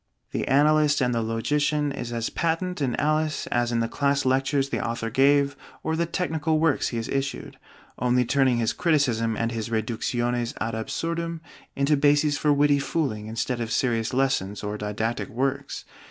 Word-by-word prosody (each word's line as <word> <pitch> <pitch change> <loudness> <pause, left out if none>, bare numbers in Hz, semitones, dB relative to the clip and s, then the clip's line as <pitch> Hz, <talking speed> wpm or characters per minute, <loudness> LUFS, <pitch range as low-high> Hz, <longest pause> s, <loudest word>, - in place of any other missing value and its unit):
The - - -2
analyst 150 +1 +4
and 125 -2 +1
the 115 - 0
logician 145 +6 0
is 125 -3 -5
as 115 -1 -2
patent 170 +1 -1
in 130 -3 0
'Alice' 155 +1 0
as 120 0 +1
in 115 -1 +1
the 115 - 0
class 140 +2 0
lectures 135 +1 +1
the - - -2
author 115 -1 -3
gave 140 +2 +3 0.3
or 160 - -1
the 170 +1 0
technical 160 -3 0
works 160 -3 +2
he 120 - -3
has 115 - -3
issued; 135 0 -3 0.4
only 125 0 +2
turning 130 -1 +2
his 115 -2 +1
criticism 120 -9 +1
and 115 0 -1
his 115 -1 -4
reductiones 120 +2 -1
ad 115 0 -2
absurdum 165 +8 -3 0.3
into 140 +2 +2
bases 145 +1 +3
for 150 0 +1
witty 145 0 +4
fooling 135 -8 -2
instead 120 +2 -2
of 115 -1 -3
serious 115 -4 0
lessons 125 -7 0
or 105 0 -3
didactic 105 +4 -3
works. 130 +2 -2
135 Hz, 170 wpm, -25 LUFS, 115-145 Hz, 0.4 s, analyst